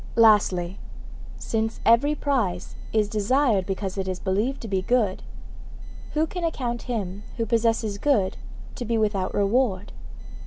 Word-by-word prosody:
Lastly, 195 -5 +4 0.6
since 225 0 -2
every 240 +7 +4
prize 235 -13 -1 0.2
is 215 -2 +2
desired 215 -1 +2
because 195 0 -3
it 190 - -2
is 185 -1 -3
believed 210 +8 0
to 230 - -6
be 195 -2 0
good, 215 -2 +1 0.9
who 310 +1 +3
can 350 +2 -6
account 250 -8 -2
him 200 -4 -3 0.2
who 230 - 0
possesses 225 -2 +1
good 210 -10 +2 0.4
to 245 - -5
be 230 0 0
without 205 -4 0
reward? 205 -1 +1
220 Hz, 140 wpm, -25 LUFS, 195-240 Hz, 0.9 s, Lastly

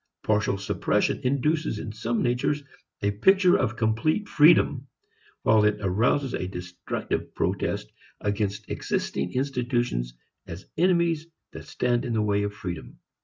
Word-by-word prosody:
Partial 105 -2 +1
suppression 100 - 0
induces 140 +1 0
in 105 - -5
some 110 +1 -1
natures 125 +4 0 0.4
a 100 - +2
picture 185 - +4
of 120 -3 0
complete 115 - 0
freedom, 145 -4 +4 0.6
while 110 -1 +5
it 105 0 +3
arouses 115 +8 +1
a 90 - -2
destructive 90 -1 -5
protest - - -1 0.3
against 100 0 -2
existing - - -2
institutions 120 - -1 0.3
as 80 +3 -8
enemies 170 -2 +2 0.2
that - - -9
stand 120 -1 0
in 120 - -2
the 110 - +1
way 100 -1 +1
of 100 0 -1
freedom. 85 -10 -7
115 Hz, 130 wpm, -26 LUFS, 100-140 Hz, 0.6 s, while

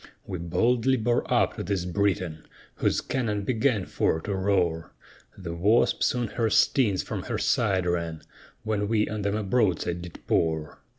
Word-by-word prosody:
We 90 - -5
boldly 115 +10 +2
bore 120 +1 0
up - - +2
to - - -3
this 95 -1 -2
Briton, 90 -4 -1 0.3
Whose - - +1
cannon 105 -6 -2
began 115 -3 +1
for 80 - 0
to 100 - -3
roar; 95 -4 0 0.4
The 85 -3 -6
Wasp 100 +8 +2
soon 120 -2 +1
her 115 -2 0
stings 105 -2 +3
from - - -4
her - - -2
side 95 -2 +1
ran, 85 -2 -2 0.4
When 105 -2 -1
we 105 -1 +1
on 110 -1 -4
them 100 +1 -1
a 110 - -2
broadside 95 -5 0
did 85 -1 -11
pour. 80 -2 0
100 Hz, 165 wpm, -26 LUFS, 85-110 Hz, 0.4 s, stings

